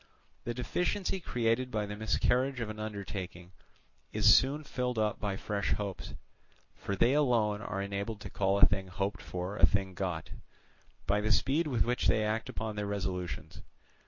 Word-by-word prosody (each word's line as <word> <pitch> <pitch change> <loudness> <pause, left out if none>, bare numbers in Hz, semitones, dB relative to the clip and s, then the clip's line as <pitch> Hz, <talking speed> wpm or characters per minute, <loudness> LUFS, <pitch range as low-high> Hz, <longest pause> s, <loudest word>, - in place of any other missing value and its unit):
The 120 - -2
deficiency 180 - -1
created 125 -4 0
by 110 -3 -1
the 105 0 -5
miscarriage 125 +5 +1
of 115 -2 -2
an 110 - -9
undertaking 95 -4 -6 0.6
is - - +6
soon 145 +4 +3
filled 125 -3 -2
up 105 -1 +1
by 100 -2 -1
fresh 100 0 -1
hopes; 100 -3 -4 0.6
for 100 - -4
they 120 +7 +4
alone 115 -8 +2
are 100 -1 -3
enabled 100 +2 -3
to - - -7
call 100 0 +1
a - - +9
thing 95 -1 0
hoped 100 +2 -3
for 90 +3 -4
a 80 - +8
thing 95 0 -1
got, 90 -4 -3 0.7
by 105 +1 +2
the 110 +1 0
speed 145 +9 +2
with 125 -7 +1
which 125 +1 +1
they 110 - +3
act 110 +1 -1
upon 110 -1 -4
their 105 -1 -2
resolutions. 95 -3 -4
105 Hz, 170 wpm, -31 LUFS, 100-120 Hz, 0.7 s, a